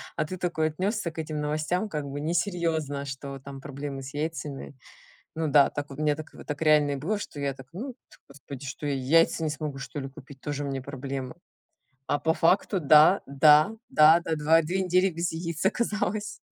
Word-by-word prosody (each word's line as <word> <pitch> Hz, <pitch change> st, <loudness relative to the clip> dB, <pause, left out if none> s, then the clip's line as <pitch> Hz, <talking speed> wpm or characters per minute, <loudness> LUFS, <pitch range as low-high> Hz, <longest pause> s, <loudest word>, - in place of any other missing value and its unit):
а 155 Hz, -, 0 dB
ты 185 Hz, +4 st, -6 dB
такой 160 Hz, -3 st, 0 dB
отнесся 185 Hz, +3 st, -2 dB
к 160 Hz, -, -9 dB
этим 155 Hz, -1 st, -4 dB
новостям 155 Hz, +7 st, -1 dB
как 150 Hz, -5 st, -3 dB
бы 140 Hz, +1 st, -5 dB
несерьезно, 165 Hz, -3 st, -1 dB
что 140 Hz, 0 st, -6 dB
там 135 Hz, 0 st, -10 dB
проблемы 140 Hz, 0 st, -6 dB
с 135 Hz, +1 st, -9 dB
яйцами. 150 Hz, -2 st, -4 dB, 0.6 s
Ну 160 Hz, 0 st, 0 dB
да, 145 Hz, -1 st, +5 dB
так 145 Hz, 0 st, -5 dB
вот 135 Hz, -, -9 dB
у -, -, -1 dB
меня 150 Hz, -1 st, +2 dB
так, 155 Hz, 0 st, -10 dB
э, -, -, -11 dB
так 150 Hz, -2 st, -5 dB
реально 150 Hz, -2 st, +4 dB
и -, -, -1 dB
было, 180 Hz, +10 st, -2 dB
что 150 Hz, -, -8 dB
я 140 Hz, -1 st, -1 dB
так: 135 Hz, -1 st, -14 dB
"Ну, 245 Hz, +10 st, -5 dB, 0.2 s
пф -, -, -18 dB
господи, 140 Hz, -1 st, -10 dB
что 135 Hz, +3 st, -6 dB
я, 145 Hz, -, 0 dB
яйца 160 Hz, +5 st, +3 dB
не 155 Hz, -, 0 dB
смогу, 150 Hz, -2 st, -4 dB
что 140 Hz, +1 st, -6 dB
ли, 135 Hz, -, -5 dB
купить? 135 Hz, 0 st, -14 dB
Тоже 145 Hz, +1 st, -4 dB
мне 135 Hz, -2 st, -3 dB
проблемы". 135 Hz, -1 st, -5 dB, 0.7 s
А -, -, +1 dB
по 160 Hz, +2 st, +2 dB
факту 185 Hz, +4 st, +2 dB
да, 155 Hz, +5 st, +6 dB
да, 150 Hz, +8 st, +5 dB
да, 155 Hz, +2 st, +6 dB
да, 165 Hz, -, -1 dB
два 160 Hz, +2 st, +4 dB
две 180 Hz, +4 st, -1 dB
недели 185 Hz, +1 st, +3 dB
без 170 Hz, 0 st, -2 dB
яиц 165 Hz, 0 st, -4 dB
оказалось. 210 Hz, -1 st, -1 dB
150 Hz, 205 wpm, -27 LUFS, 140-165 Hz, 0.7 s, да